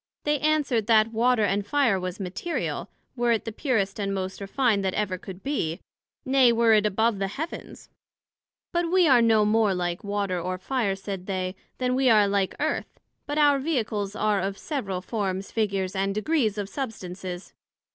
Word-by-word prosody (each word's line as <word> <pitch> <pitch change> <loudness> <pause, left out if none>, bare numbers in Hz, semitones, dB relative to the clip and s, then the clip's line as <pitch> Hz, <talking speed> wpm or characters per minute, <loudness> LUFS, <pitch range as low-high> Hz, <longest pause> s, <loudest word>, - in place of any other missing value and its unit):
They 295 -1 +1
answered, 285 -8 +1
that 225 0 +4
Water 235 0 +3
and 200 0 +1
Fire 230 -3 +2
was 180 +1 -5
material, 195 - -3 0.3
were 240 -1 +2
it 225 - -2
the 225 - -3
purest 215 -5 -1
and 200 -1 -1
most 190 0 -4
refined 205 0 +1
that 190 -1 -1
ever 190 -3 -1
could 190 +1 -10
be; 195 - -2 0.5
nay, 260 -2 +5
were 230 -1 +4
it 210 -1 +4
above 220 +1 +1
the 195 - 0
Heavens: 305 - -7 0.9
But 345 -1 0
we 370 -2 +5
are 255 -4 +6
no 220 -2 +4
more 210 -2 +3
like 175 -1 -2
Water 200 -3 -1
or 185 +1 -3
Fire, 205 0 -1
said 195 -1 -6
they, 185 -1 -2 0.2
then 250 0 0
we 260 0 +3
are 210 -3 +5
like 200 -1 0
Earth; - - -2 0.3
but 290 +1 -2
our 290 -2 +5
Vehicles 220 -9 -2
are 210 -2 +1
of 195 +1 -3
several 200 - -3
forms, 195 -2 -3
figures 200 -3 -1
and 195 +1 0
degrees 220 -2 +1
of 205 -2 -2
substances. 190 -6 -6
210 Hz, 175 wpm, -26 LUFS, 195-250 Hz, 0.9 s, are